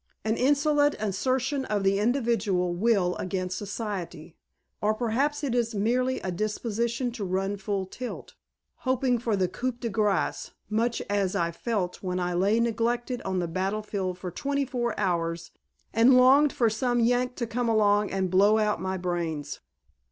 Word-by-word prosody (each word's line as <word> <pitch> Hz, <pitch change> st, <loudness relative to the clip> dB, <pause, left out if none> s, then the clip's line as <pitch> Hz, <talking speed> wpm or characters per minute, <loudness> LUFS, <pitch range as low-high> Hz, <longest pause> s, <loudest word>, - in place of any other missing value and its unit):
An 220 Hz, +1 st, +1 dB
insolent 290 Hz, +2 st, +3 dB
assertion 260 Hz, +7 st, 0 dB
of 205 Hz, -2 st, -1 dB
the 195 Hz, +1 st, +2 dB
individual 210 Hz, -7 st, +1 dB
will 190 Hz, -2 st, +2 dB
against 185 Hz, -1 st, -3 dB
Society. 185 Hz, -6 st, -5 dB, 0.5 s
Or 215 Hz, +1 st, +2 dB
perhaps 265 Hz, +6 st, 0 dB
it 270 Hz, -4 st, -1 dB
is 235 Hz, -2 st, 0 dB
merely 250 Hz, +5 st, +1 dB
a 185 Hz, -, -3 dB
disposition 230 Hz, +5 st, -2 dB
to 230 Hz, -3 st, -6 dB
run 195 Hz, +2 st, -1 dB
full 195 Hz, -1 st, -2 dB
tilt, 250 Hz, +6 st, -7 dB, 0.4 s
hoping 255 Hz, -1 st, +1 dB
for 225 Hz, -2 st, 0 dB
the 190 Hz, -2 st, +1 dB
coup 255 Hz, +7 st, -3 dB
de 235 Hz, 0 st, -5 dB
grace 210 Hz, -2 st, 0 dB, 0.2 s
much 230 Hz, +2 st, 0 dB
as 200 Hz, -2 st, 0 dB
I 170 Hz, 0 st, 0 dB
felt 185 Hz, -1 st, -3 dB
when 185 Hz, -1 st, -2 dB
I 180 Hz, 0 st, -1 dB
lay 200 Hz, +6 st, +2 dB
neglected 240 Hz, +2 st, 0 dB
on 190 Hz, -1 st, -2 dB
the 175 Hz, -1 st, 0 dB
battlefield 190 Hz, +1 st, -2 dB
for 180 Hz, -1 st, -6 dB
twenty 280 Hz, +8 st, -1 dB
four 240 Hz, -3 st, -2 dB
hours 170 Hz, -3 st, -1 dB, 0.4 s
and 240 Hz, +4 st, +6 dB
longed 270 Hz, +3 st, +6 dB
for 235 Hz, -, +2 dB
some 240 Hz, +2 st, 0 dB
Yank 245 Hz, +2 st, +2 dB
to 235 Hz, -, -2 dB
come 235 Hz, +1 st, -1 dB
along 210 Hz, -2 st, +3 dB
and 190 Hz, -2 st, -1 dB
blow 200 Hz, +3 st, +5 dB
out 210 Hz, -5 st, +1 dB
my 190 Hz, 0 st, -2 dB
brains." 170 Hz, -4 st, -3 dB
215 Hz, 160 wpm, -27 LUFS, 190-245 Hz, 0.5 s, and